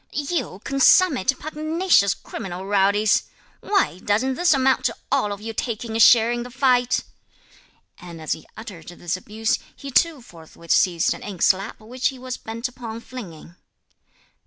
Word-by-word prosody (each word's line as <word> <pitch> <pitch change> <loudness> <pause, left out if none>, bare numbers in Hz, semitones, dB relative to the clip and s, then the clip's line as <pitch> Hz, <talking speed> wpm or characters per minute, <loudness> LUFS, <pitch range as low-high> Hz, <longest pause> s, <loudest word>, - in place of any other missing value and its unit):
"You 285 - -3
consummate 275 - +4
pugnacious 310 - +1
criminal 185 0 -7
rowdies! 200 +1 +2 0.3
why, 390 - 0
doesn't 220 +7 0
this 350 +6 +2
amount 265 -2 +3
to - - 0 0.2
all 265 -7 +1
of 200 0 -6
you 225 +1 -6
taking 225 0 -4
a - - 0
share 230 +1 +7
in 240 0 -2
the 245 - -7
fight!" 250 -1 +2 1.0
And 170 -2 -10
as 155 - -5
he 160 - -3
uttered 205 -8 -10
this 175 0 -4
abuse, 215 +4 -2 0.2
he 275 - -8
too 310 -1 +2
forthwith 165 -3 -11
seized 175 -3 +3
an - - -10
inkslab, 195 +1 0
which 245 +4 -2
he 265 - -4
was 255 0 -6
bent 230 +3 -5
upon 235 -2 -8
flinging. 175 -10 -10
230 Hz, 155 wpm, -22 LUFS, 195-265 Hz, 1.0 s, share